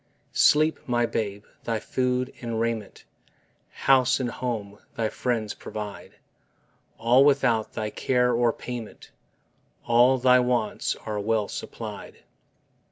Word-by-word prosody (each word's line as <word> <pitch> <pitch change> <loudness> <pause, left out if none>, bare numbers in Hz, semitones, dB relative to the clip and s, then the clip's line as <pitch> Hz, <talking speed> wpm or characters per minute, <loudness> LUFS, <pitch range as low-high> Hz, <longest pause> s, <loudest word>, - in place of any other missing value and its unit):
Sleep, 155 +1 +4
my 120 -1 +2
babe; 105 -3 -3 0.2
thy 115 -1 -1
food 125 +1 -1
and 115 -2 -3
raiment, 115 -3 -3 0.6
House 130 0 +3
and 125 -2 -2
home, 110 -6 -4 0.2
thy 110 -1 -1
friends 115 -4 -2
provide; 105 -2 -8 0.8
All 120 +4 +5
without 130 -6 +2
thy 110 -1 -3
care 125 +1 +1
or 120 0 +3
payment: 120 -3 -8 0.7
All 120 +3 +5
thy 125 0 +5
wants 125 -3 0
are 105 -1 -3
well 110 0 0
supplied. - - -8
120 Hz, 115 wpm, -25 LUFS, 110-125 Hz, 0.8 s, All